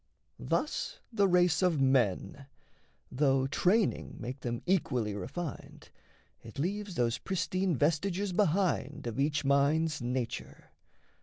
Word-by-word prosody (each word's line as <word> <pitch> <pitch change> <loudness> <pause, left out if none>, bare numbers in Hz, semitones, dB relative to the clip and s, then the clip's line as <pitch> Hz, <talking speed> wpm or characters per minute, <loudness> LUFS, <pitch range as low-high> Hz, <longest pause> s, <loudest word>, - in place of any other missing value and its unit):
Thus - - -2 0.2
the 200 -2 +3
race 180 -2 +3
of 175 -5 +2
men: 135 0 +1 0.6
Though 135 0 +2
training 185 +9 +1
make 125 +3 -6
them 120 -2 -4
equally 125 - 0
refined, 145 - -6 0.5
It 115 - -12
leaves 195 +5 -2
those 120 -2 0
pristine 185 -1 -1
vestiges 180 - 0
behind 170 -7 +1
Of 115 +1 -4
each 145 +1 +1
mind's 150 +2 +2
nature. 120 -1 -4
150 Hz, 110 wpm, -31 LUFS, 130-180 Hz, 0.6 s, the